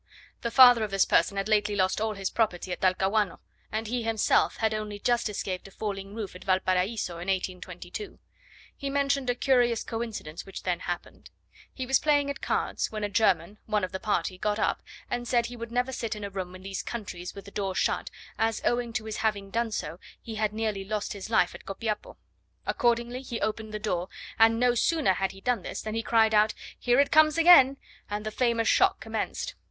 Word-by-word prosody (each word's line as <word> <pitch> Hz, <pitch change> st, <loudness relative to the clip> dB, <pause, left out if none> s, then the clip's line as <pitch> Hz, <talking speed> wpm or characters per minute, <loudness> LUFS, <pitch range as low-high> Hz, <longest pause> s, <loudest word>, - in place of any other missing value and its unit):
The 235 Hz, -, -1 dB
father 245 Hz, -2 st, +8 dB
of 215 Hz, -, -2 dB
this 195 Hz, -1 st, +3 dB
person 200 Hz, -, +2 dB
had 195 Hz, -, -1 dB
lately 210 Hz, -1 st, +2 dB
lost 190 Hz, +1 st, +1 dB
all 220 Hz, -1 st, -1 dB
his 195 Hz, -1 st, -3 dB
property 190 Hz, -5 st, 0 dB
at 180 Hz, -, -4 dB
Talcahuano, 190 Hz, +2 st, +1 dB, 0.3 s
and 220 Hz, +1 st, -2 dB
he 240 Hz, +2 st, -2 dB
himself 225 Hz, -1 st, +2 dB
had 220 Hz, -1 st, +1 dB
only 215 Hz, -1 st, -4 dB
just 235 Hz, +2 st, +1 dB
escaped 190 Hz, -2 st, -4 dB
a -, -, -12 dB
falling 195 Hz, 0 st, -5 dB
roof 210 Hz, -5 st, -5 dB
at 180 Hz, -, -10 dB
Valparaiso, 185 Hz, 0 st, 0 dB
in 175 Hz, -, -7 dB
1822. 190 Hz, -, -4 dB, 0.6 s
He 280 Hz, -, -4 dB
mentioned 275 Hz, -2 st, +1 dB
a 245 Hz, -, +2 dB
curious 245 Hz, -3 st, +2 dB
coincidence 225 Hz, -9 st, -5 dB
which 195 Hz, -, -9 dB
then 180 Hz, -2 st, 0 dB
happened: 175 Hz, -1 st, -6 dB, 0.4 s
he 260 Hz, -, -5 dB
was 260 Hz, 0 st, +3 dB
playing 290 Hz, -2 st, +2 dB
at -, -, -8 dB
cards, -, -, -1 dB
when 215 Hz, -1 st, -4 dB
a 205 Hz, -, -1 dB
German, 210 Hz, 0 st, +1 dB
one 210 Hz, -2 st, +1 dB
of 185 Hz, -, -2 dB
the 190 Hz, -, -4 dB
party, 185 Hz, -3 st, -1 dB
got 210 Hz, +1 st, 0 dB
up, -, -, 0 dB, 0.3 s
and 240 Hz, 0 st, -3 dB
said 235 Hz, -1 st, +2 dB
he 245 Hz, -, -6 dB
would 230 Hz, -1 st, -7 dB
never 250 Hz, +2 st, 0 dB
sit 230 Hz, -4 st, -3 dB
in 210 Hz, -, -7 dB
a 200 Hz, -, -5 dB
room 185 Hz, -2 st, -5 dB
in 185 Hz, -, -12 dB
these 195 Hz, -1 st, -4 dB
countries 185 Hz, -6 st, -6 dB
with 200 Hz, -, -9 dB
the 200 Hz, -, -11 dB
door 195 Hz, -2 st, -2 dB
shut, -, -, 0 dB, 0.3 s
as 225 Hz, 0 st, +1 dB
owing 240 Hz, -1 st, 0 dB
to 220 Hz, -2 st, -2 dB
his 220 Hz, -1 st, -4 dB
having 210 Hz, -3 st, -1 dB
done 230 Hz, +1 st, 0 dB
so, 170 Hz, -5 st, -4 dB, 0.2 s
he 230 Hz, -, -8 dB
had 215 Hz, -1 st, 0 dB
nearly 215 Hz, -2 st, -2 dB
lost 210 Hz, +1 st, -3 dB
his 200 Hz, +1 st, -7 dB
life 180 Hz, -6 st, +3 dB
at -, -, -11 dB
Copiapo. 210 Hz, +2 st, -4 dB, 0.5 s
Accordingly 240 Hz, +1 st, 0 dB
he 240 Hz, -3 st, -5 dB
opened 220 Hz, 0 st, -2 dB
the 215 Hz, -, -3 dB
door; 185 Hz, -4 st, -2 dB, 0.3 s
and 225 Hz, 0 st, +5 dB
no 245 Hz, 0 st, +4 dB
sooner 290 Hz, -, +2 dB
had 195 Hz, +1 st, -1 dB
he 195 Hz, -, -14 dB
done 245 Hz, -3 st, 0 dB
this, -, -, -5 dB
than 215 Hz, -, -5 dB
he 225 Hz, -, -1 dB
cried 225 Hz, -1 st, +3 dB
out, 215 Hz, 0 st, +4 dB, 0.2 s
"Here 245 Hz, +1 st, +3 dB
it 280 Hz, -, +3 dB
comes 310 Hz, 0 st, +5 dB
again!" 300 Hz, -6 st, +7 dB, 0.3 s
and 210 Hz, +1 st, -4 dB
the 215 Hz, -, -2 dB
famous 230 Hz, -1 st, +1 dB
shock 385 Hz, 0 st, +4 dB
commenced. -, -, -3 dB
215 Hz, 210 wpm, -28 LUFS, 195-240 Hz, 0.6 s, father